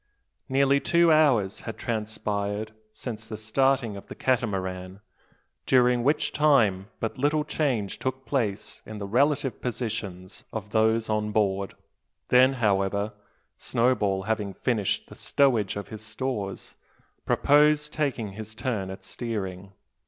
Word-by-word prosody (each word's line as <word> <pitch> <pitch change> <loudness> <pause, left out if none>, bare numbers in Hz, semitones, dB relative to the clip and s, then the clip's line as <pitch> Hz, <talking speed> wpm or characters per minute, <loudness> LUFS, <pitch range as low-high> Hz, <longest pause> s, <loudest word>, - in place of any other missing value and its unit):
Nearly 140 +1 +3
two 170 +2 +4
hours 125 -11 +3
had 115 - -6
transpired 110 -1 -3 0.2
since 110 -1 -7
the 110 -1 -6
starting 120 +1 +1
of 100 - -10
the - - -8
Catamaran, 95 -7 -1 0.7
during 125 -1 +4
which 145 +4 +2
time 110 -11 +3
but 115 +3 -3
little 150 +2 +2
change 130 -10 -1
took 130 0 -3
place 110 -7 -2
in 110 - -8
the 100 - -5
relative 135 +5 +1
positions 105 -6 -4
of 105 -2 -6
those 110 0 +2
on 105 -1 -1
board. 100 -2 0 0.5
Then, 130 +2 +6
however, 100 -3 0 0.5
Snowball 105 -6 +1
having 105 -2 -2
finished 110 -6 0
the - - -12
stowage 120 -8 +1
of 100 - -6
his 110 -1 -8
stores, 110 -3 -4 0.5
proposed 150 +1 +3
taking 130 -9 -1
his 110 +2 -9
turn 110 -6 -2
at 95 0 -9
steering. 100 -4 -5
110 Hz, 130 wpm, -26 LUFS, 100-130 Hz, 0.7 s, Then